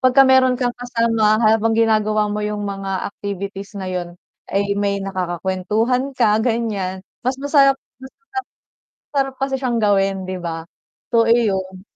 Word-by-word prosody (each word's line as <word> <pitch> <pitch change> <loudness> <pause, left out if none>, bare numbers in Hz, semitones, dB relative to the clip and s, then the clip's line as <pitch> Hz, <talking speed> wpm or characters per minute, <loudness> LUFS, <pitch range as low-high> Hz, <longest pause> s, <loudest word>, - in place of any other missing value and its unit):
Pag 255 0 +3
ka 270 - +9
meron 260 -1 +5
kang 245 -2 0
kasama 230 -3 +1
habang 225 +1 +3
ginagawa 215 -1 +2
mo 210 0 -2
'yung 210 0 -2
mga 195 -1 -3
activities 200 0 -6
na 190 - -5
'yun, 180 -1 -3 0.4
ay 200 +1 0
may 200 -1 0
nakakakwentuhan 195 +8 -1
ka 210 -3 +3
gan'yan, 215 -5 -1 0.2
mas 255 - +2
masarap 275 -1 +4 0.2
mas 265 0 -11 0.8
masarap. - - -84
Sarap 270 -1 0
kasi 270 0 0
siyang 250 -3 -1
gawin 195 -2 +2
'di 185 0 -4
ba? 165 -1 -5 0.5
So, 230 0 +5
iyon. 195 -5 +1
210 Hz, 150 wpm, -20 LUFS, 195-245 Hz, 0.8 s, ka